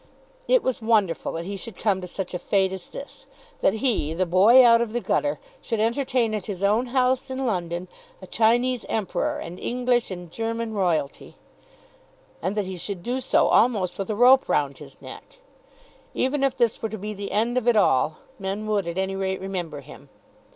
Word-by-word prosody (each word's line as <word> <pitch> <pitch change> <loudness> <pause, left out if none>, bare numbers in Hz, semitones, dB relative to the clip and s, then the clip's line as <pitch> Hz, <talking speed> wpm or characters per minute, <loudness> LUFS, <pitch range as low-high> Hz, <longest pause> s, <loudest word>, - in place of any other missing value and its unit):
It - - +4
was 260 -2 -1
wonderful 215 -7 +1
that 165 +1 -4
he 200 +2 -4
should 200 0 -9
come 200 -3 0
to 180 - -6
such 185 +1 -6
a 180 - -3
fate 190 +1 +1
as 190 -1 -8
this; - - -10 0.3
that 195 - +2
he, 165 - 0
the 185 +2 +1
boy 205 +9 +6
out 230 0 +6
of 230 -2 -2
the 240 - 0
gutter, 290 +4 0 0.2
should 225 -3 -3
entertain 235 0 +1
at 210 -3 -4
his 200 -2 -5
own 215 +5 +2
house, 255 +1 +1
in 260 0 -3
London, 175 -4 -2 0.3
a - - -10
Chinese 240 +2 +2
Emperor 215 -5 -1
and 170 +2 -8
English 245 -1 0
and 175 -3 -8
German 230 +2 -3
Royalty, 170 -8 -1 1.1
and 195 - -2
that 205 - 0
he 185 -1 -6
should 180 0 -5
do 250 +2 -2
so 255 - +3
almost 200 -7 +2
with 195 - -3
a 215 - -1
rope 255 +4 +5
round 140 -2 0
his - - -13
neck. - - -11 0.8
Even 270 +2 0
if 270 -1 +1
this 235 -2 +1
were 225 - -2
to 220 - -6
be 210 +2 -5
the 200 0 -6
end 230 +4 0
of 250 -2 -1
it 240 - +5
all, 155 -7 +3 0.2
men 195 +2 -4
would 205 -4 0
at 170 +1 -4
any 190 0 -1
rate 190 -1 -2
remember 175 -6 -5
him. - - -14
210 Hz, 200 wpm, -24 LUFS, 185-240 Hz, 1.1 s, boy